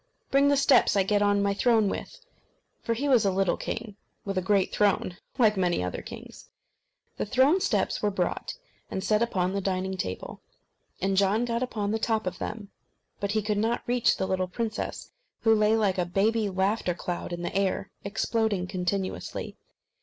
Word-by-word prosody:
bring 275 Hz, +1 st, +5 dB
the 285 Hz, 0 st, +4 dB
steps 280 Hz, -4 st, +4 dB
I 195 Hz, -, +4 dB
get 205 Hz, +2 st, +1 dB
on 205 Hz, 0 st, +3 dB
my 200 Hz, 0 st, +2 dB
throne 220 Hz, 0 st, +3 dB
with." -, -, -5 dB, 0.6 s
For 230 Hz, -, -1 dB
he 280 Hz, +5 st, -2 dB
was 250 Hz, -5 st, +5 dB
a 200 Hz, -, +3 dB
little 190 Hz, -1 st, +1 dB
king 220 Hz, -3 st, -5 dB, 0.3 s
with 195 Hz, -1 st, -3 dB
a 185 Hz, -, +1 dB
great 195 Hz, 0 st, +2 dB
throne, 200 Hz, -3 st, +1 dB, 0.2 s
like 220 Hz, -4 st, +4 dB
many 175 Hz, -, +1 dB
other 90 Hz, -, -4 dB
kings. -, -, -11 dB, 0.7 s
The -, -, -1 dB
throne 265 Hz, -, +4 dB
steps -, -, 0 dB
were 210 Hz, -, +2 dB
brought, 185 Hz, -3 st, -2 dB, 0.3 s
and 190 Hz, -, -3 dB
set 215 Hz, 0 st, +2 dB
upon 185 Hz, -6 st, 0 dB
the 200 Hz, -, -1 dB
dining 190 Hz, 0 st, -2 dB
table, 95 Hz, -, -5 dB, 0.6 s
and 195 Hz, +1 st, 0 dB
John 200 Hz, +4 st, +3 dB
got 235 Hz, 0 st, -1 dB
upon 210 Hz, -5 st, -2 dB
the 220 Hz, -, 0 dB
top 220 Hz, -1 st, 0 dB
of 185 Hz, -, -4 dB
them. 210 Hz, -2 st, -6 dB, 0.5 s
But, 200 Hz, 0 st, -1 dB
he 215 Hz, -1 st, +1 dB
could 210 Hz, 0 st, 0 dB
not 230 Hz, +3 st, 0 dB
reach 245 Hz, 0 st, +2 dB
the 190 Hz, -, -1 dB
little 185 Hz, -1 st, -1 dB
princess, 220 Hz, +3 st, -4 dB, 0.3 s
who 225 Hz, -, +5 dB
lay 215 Hz, 0 st, +4 dB
like 200 Hz, -4 st, +1 dB
a 180 Hz, -, +1 dB
baby 210 Hz, +4 st, +1 dB
laughter 190 Hz, -1 st, 0 dB
cloud 175 Hz, 0 st, -4 dB
in 175 Hz, 0 st, -4 dB
the 175 Hz, -, -4 dB
air, 195 Hz, 0 st, 0 dB
exploding 215 Hz, -1 st, 0 dB
continuously. 185 Hz, +1 st, -3 dB
205 Hz, 185 wpm, -27 LUFS, 190-225 Hz, 0.7 s, bring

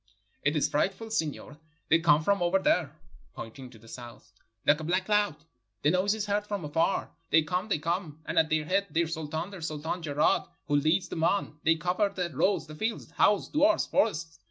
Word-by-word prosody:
*'It 145 Hz, +2 st, +1 dB
is 150 Hz, -, +2 dB
frightful, 195 Hz, +8 st, -1 dB
signor; 155 Hz, -6 st, -3 dB, 0.3 s
they 165 Hz, -, +5 dB
come 155 Hz, -2 st, +4 dB
from 200 Hz, +2 st, +2 dB
over 175 Hz, +2 st, +3 dB
there," 155 Hz, -5 st, +1 dB, 0.4 s
pointing 125 Hz, +3 st, -8 dB
to 120 Hz, -, -15 dB
the 115 Hz, +1 st, -18 dB
south, 120 Hz, -3 st, -11 dB, 0.3 s
"Hke 145 Hz, +1 st, +5 dB
a -, -, -6 dB
black 180 Hz, +4 st, 0 dB
cloud; 210 Hz, -5 st, +2 dB, 0.5 s
the 150 Hz, -, +4 dB
noise 190 Hz, +4 st, +2 dB
is 215 Hz, -1 st, -3 dB
heard 205 Hz, 0 st, -1 dB
from 200 Hz, -6 st, -3 dB
afar. 165 Hz, +6 st, 0 dB, 0.2 s
They 160 Hz, 0 st, +5 dB
come, 180 Hz, +6 st, -2 dB
they 195 Hz, -, +2 dB
come, 165 Hz, 0 st, -3 dB
and -, -, +1 dB
at 160 Hz, -1 st, +2 dB
their 155 Hz, -1 st, +1 dB
head 195 Hz, +4 st, +1 dB
their 170 Hz, +1 st, +1 dB
sultan, 160 Hz, +2 st, -4 dB
the 190 Hz, -3 st, -9 dB
Sultan 160 Hz, +2 st, -3 dB
Jeraad, 150 Hz, -1 st, +1 dB, 0.2 s
who 145 Hz, 0 st, 0 dB
leads 165 Hz, +5 st, +1 dB
them 160 Hz, -, -3 dB
on; 165 Hz, -4 st, 0 dB
they 165 Hz, 0 st, +4 dB
cover 180 Hz, +5 st, 0 dB
the 180 Hz, -3 st, -3 dB
roads, 185 Hz, +5 st, +2 dB
the 155 Hz, -, -10 dB
fields, 220 Hz, +8 st, -3 dB
houses, 205 Hz, -1 st, +2 dB
duars, 305 Hz, +2 st, +3 dB
forests. 170 Hz, -, 0 dB
165 Hz, 205 wpm, -28 LUFS, 150-195 Hz, 0.5 s, they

